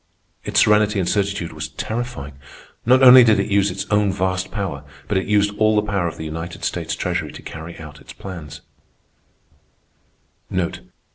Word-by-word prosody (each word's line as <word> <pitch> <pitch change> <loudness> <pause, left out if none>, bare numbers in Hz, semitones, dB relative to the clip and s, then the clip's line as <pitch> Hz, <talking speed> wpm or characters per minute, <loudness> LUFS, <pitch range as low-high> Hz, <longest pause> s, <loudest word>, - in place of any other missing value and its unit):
Its - - +1
serenity 105 -1 +4
and 90 - -1
certitude 100 -4 -1
was 80 0 -5
terrifying. 110 - -5 0.5
Not 130 +2 +5
only 130 0 +10
did 110 -2 +4
it - - -2
use 100 0 +3
its 95 +1 -4
own 105 -1 +3
vast 95 -1 -1
power, 95 -9 -4 0.2
but 105 - -1
it 95 - 0
used 105 0 +2
all 110 0 +3
the 105 - +2
power 100 -4 -1
of 80 - -6
the 80 - -6
United 85 +2 -6
States - - -2
Treasury - - -2
to - - -11
carry 80 +2 -8
out 75 -2 -11
its - - -12
plans. 80 -6 -9
100 Hz, 165 wpm, -21 LUFS, 85-105 Hz, 0.5 s, only